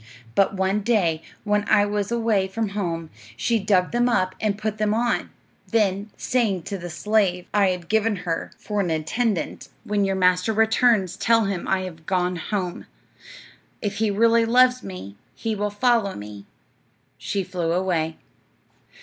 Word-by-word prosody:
"'But 195 0 +2
one 190 +2 +1
day, 195 -8 +1 0.2
when 210 0 +1
I 205 - +5
was 205 0 -2
away 225 -5 +1
from 215 +2 -2
home, 170 -5 -3 0.3
she 230 - +1
dug 190 -3 +2
them 240 +1 +2
up 185 -6 +1
and 205 -2 0
put 215 0 -3
them 215 0 +1
on; 240 +1 0 0.4
then, 205 -2 +1
saying 215 -8 0
to 200 - -4
the 175 0 -6
slave 180 0 +1
I 205 -2 +4
had 180 -2 -3
given 220 0 +2
her 165 -1 -2
for 210 -1 -3
an 185 -3 0
attendant, 165 +4 -1
"When 205 -1 0
your 195 0 0
master 180 +3 +2
returns 220 -4 +3
tell 225 0 +3
him 195 -3 -3
I 190 -1 +1
have 165 -4 -8
gone 180 -1 0
home; 180 +1 -4 0.9
if 205 -1 -3
he 220 -1 +1
really 230 +3 +4
loves 250 +2 +4
me 105 - -8 0.2
he 220 +10 -2
will 210 0 -1
follow 205 -1 +1
me," 105 -1 -9 0.7
she 200 -1 -2
flew 175 -2 -2
away. 170 -3 0
200 Hz, 160 wpm, -23 LUFS, 180-220 Hz, 0.9 s, I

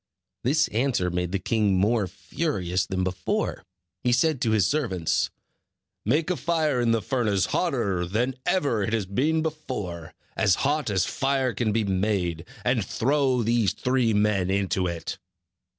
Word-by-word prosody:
This 145 +6 +3
answer 115 -6 0
made 90 0 -2
the 100 - +1
king 105 0 +1
more 105 +1 +2
furious 90 - -2
than 95 -1 -1
before. 90 0 -2 0.4
He 125 - +1
said 135 +2 +2
to 115 - +1
his 110 -4 +3
servants: 95 - 0 0.8
"Make 155 - +1
a 180 - -1
fire 155 -6 +1
in 120 - +2
the 115 -2 +1
furnace 105 -8 +1
hotter 110 - 0
than 120 +8 0
ever 140 - +1
it 105 +3 -1
has 110 -4 0
been 150 - +1
before, 105 - -5 0.2
as 90 - +3
hot 145 -2 +1
as 95 -4 +1
fire 135 -2 0
can 110 +1 0
be 110 +1 +1
made; 95 -4 -1 0.2
and 125 -4 +2
throw 130 +3 +1
these 115 -2 +2
three 125 -2 +1
men 105 -3 +2
into 95 -1 0
it." 85 -1 -5
110 Hz, 155 wpm, -25 LUFS, 95-130 Hz, 0.8 s, This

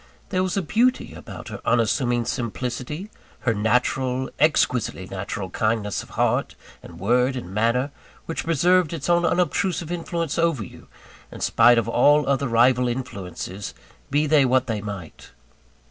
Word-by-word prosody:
There 185 -2 0
was 185 +1 -1
a 195 - 0
beauty 245 +9 +1
about - - -9
her - - -7
unassuming 120 +1 +1
simplicity, 125 - -4 0.3
her 120 - +1
natural 125 +4 0
exquisitely 125 -10 +1
natural 95 0 -5
kindness 110 -1 -1
of - - -13
heart, - - +1 0.3
and 85 -1 -12
word, 125 +6 +2
and 95 -7 -6
manner, 115 +6 +1 0.3
which 165 - -4
preserved 170 +1 +3
its 160 0 -4
own 175 0 +3
unobtrusive 180 -1 0
influence 170 -2 -2
over 165 -8 +1
you, - - -13 0.4
in - - -9
spite 120 0 +5
of 115 -1 +1
all 145 +6 +4
other 140 0 +1
rival 125 +2 +4
influences, 100 -5 -5 0.3
be 145 +2 +2
they 150 -1 +4
what 130 0 +2
they 110 -4 -3
might. 100 -6 -8
125 Hz, 145 wpm, -23 LUFS, 115-155 Hz, 0.4 s, spite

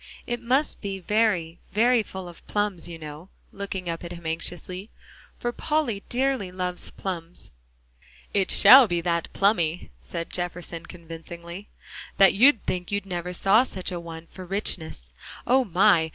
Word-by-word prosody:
It 240 -1 -3
must 260 +5 +1
be 195 -2 -3
very, 185 -4 0
very 235 +3 +4
full 190 -3 -8
of 175 - -14
plums, 205 -5 -1
you 170 - -7
know," 155 +3 -9 0.2
looking 195 -2 -5
up 165 0 -3
at 170 - -6
him 170 -1 -11
anxiously, 180 +4 -3 0.5
"for 240 - -2
Polly 265 -7 -1
dearly 255 -6 0
loves 180 -1 -2
plums." 175 - -6 0.8
"It 195 -2 +1
shall 260 -1 +9
be 175 -3 0
that 170 -1 -1
plummy," 175 - +1
said 165 - -6
Jefferson 175 -1 -4
convincingly, 170 +2 -9 0.5
"that 195 -1 +7
you'd 240 +2 +5
think 180 0 -3
you 200 0 0
never 180 -2 -4
saw 195 +5 +4
such 190 -8 -3
a 175 - -3
one 165 -1 -9
for 185 - -8
richness. 165 - -2 0.3
Oh, 260 +2 +4
my! 180 -3 +4
180 Hz, 150 wpm, -25 LUFS, 170-210 Hz, 0.8 s, shall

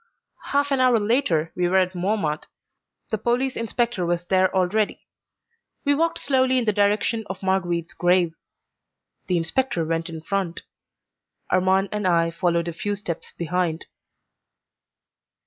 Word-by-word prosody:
Half 285 0 +1
an 275 - +2
hour 250 -3 +4
later 205 - +1
we 180 -1 +1
were 190 - +3
at 185 -1 +2
Montmartre. 180 -4 -1 0.6
The 220 - 0
police 245 +4 0
inspector 230 -3 -1
was 175 0 -1
there 185 0 +3
already. 195 +3 0 0.8
We 285 - +4
walked 330 +3 +1
slowly 260 -2 +2
in 245 - +1
the 215 - +2
direction 210 +2 +1
of 190 0 -7
Marguerite's 175 -3 0
grave. 175 -1 +2 0.9
The 180 - +1
inspector 170 +2 0
went 165 +1 -2
in 160 -1 -7
front; 185 0 -2 0.9
Armand 190 +1 +3
and 210 -2 -1
I 165 -1 +3
followed 170 0 0
a 170 - -3
few 205 +5 -2
steps 175 -5 -6
behind. 170 -1 -1
190 Hz, 140 wpm, -23 LUFS, 170-220 Hz, 0.9 s, hour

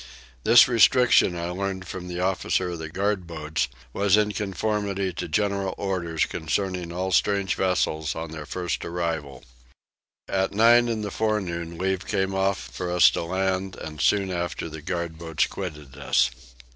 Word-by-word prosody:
This 120 - +8
restriction 125 -5 +5
I 85 +1 -3
learnt 95 0 -3
from 90 +1 -7
the 90 0 -5
officer 95 -1 0
of 85 - -5
the 80 -1 -6
guard 95 +1 -1
boats 80 -1 -2 0.3
was 100 0 +3
in 105 0 +2
conformity 100 -1 -2
to 85 - -4
general 100 +3 0
orders 85 -5 -1
concerning 90 +1 -2
all 95 +2 -2
strange 100 0 +2
vessels 80 -4 0
on 80 -1 -5
their 75 -2 -7
first 90 -2 -3
arrival. 80 -6 -3 0.8
At 95 +1 0
nine 120 +3 +6
in 110 -2 -2
the 100 - -4
forenoon 90 -7 -2
leave 95 0 -1
came 95 -2 0
off 95 0 +1
for 90 -1 -6
us 90 -1 +6
to - - -2
land 95 +2 -1
and 75 -1 -7
soon 100 -2 +2
after 85 -1 -3
the 80 0 -8
guard 85 -1 -4
boats 80 -2 0
quitted 75 -8 -7
us. 70 -1 +2
95 Hz, 160 wpm, -25 LUFS, 85-100 Hz, 0.8 s, This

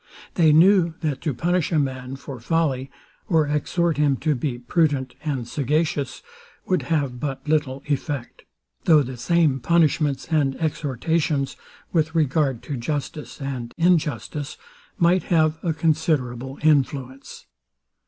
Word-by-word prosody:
They 160 -3 +4
knew, 170 +1 +5
that 150 -5 -2
to 155 -4 -1
punish 175 +6 0
a 165 - +2
man 130 -2 -2
for 135 -2 -8
folly, 135 0 0 0.4
or 160 -4 +3
exhort 155 +2 0
him 145 -2 +2
to 155 +3 +1
be 130 -1 -2
prudent 135 0 0
and 135 -6 -2
sagacious, 145 +1 -1 0.4
would 185 -4 +1
have 140 -6 0
but 135 0 -4
little 145 -3 0
effect; 140 -3 -3 0.4
though 155 -4 +6
the 130 0 -6
same 140 +2 +2
punishments 150 -1 +2
and 145 -4 +1
exhortations, 150 -1 -1 0.4
with 160 -1 +1
regard 140 -5 +1
to 140 +1 -4
justice 145 +4 -4
and 130 -4 -5
injustice, 150 - 0 0.4
might 175 +2 +3
have 160 -2 +2
a 170 - 0
considerable 150 -5 0
influence. 135 -3 0
150 Hz, 130 wpm, -23 LUFS, 135-160 Hz, 0.4 s, though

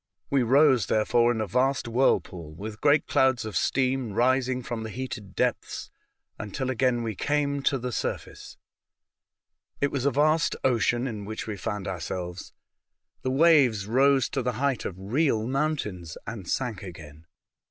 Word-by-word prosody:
We 140 -1 +3
rose, 130 -3 +4
therefore, 120 +2 +3
in 110 -2 -1
a - - 0
vast 125 +6 0
whirlpool, 90 - 0
with 105 +5 -8
great 145 0 +4
clouds 130 -4 +2
of 110 - -6
steam 130 -4 0
rising 130 +2 +1
from 115 -1 -4
the 110 - -5
heated 110 -4 -6
depths, - - -2 0.5
until 110 +5 -3
again 125 -1 +1
we 110 -1 -2
came 140 +5 0
to 135 0 +1
the 125 0 -4
surface. - - -5 1.2
It 145 - +1
was 135 -2 -2
a - - +5
vast 155 +4 +2
ocean 120 0 +2
in 110 -5 -4
which 110 +1 -5
we 110 - -4
found 105 0 -4
our 95 -3 -3
selves. 90 +2 -5 0.7
The 130 - -2
waves 135 -8 +4
rose 135 +3 +3
to 135 - -2
the 125 0 -1
height 135 +2 -1
of 95 - -4
real 110 +3 0
mountains, 125 - -2
and 105 -6 -7
sank 115 -7 -2
again. 80 -4 -11
120 Hz, 160 wpm, -26 LUFS, 105-135 Hz, 1.2 s, a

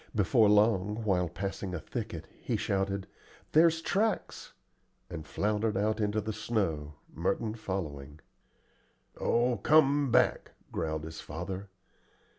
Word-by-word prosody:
Before 110 +2 +4
long, 105 0 +3
while 90 -4 +1
passing 95 +1 -4
a - - -3
thicket, - - -5 0.2
he - - -1
shouted, 95 0 -1 0.5
"There's 165 +1 +5
tracks," 215 +5 -1 0.6
and 80 -2 -6
floundered 105 +2 0
out 105 +2 +1
into 105 0 +1
the 110 +1 -3
snow, 80 -11 -2 0.2
Merton 100 +6 -1
following. 75 -9 -5 1.0
"Oh, 120 +1 +2
come 145 -2 +4
back," - - +2 0.2
growled 80 -1 -2
his 80 0 -7
father. 95 +5 -6
100 Hz, 115 wpm, -30 LUFS, 90-110 Hz, 1.0 s, There's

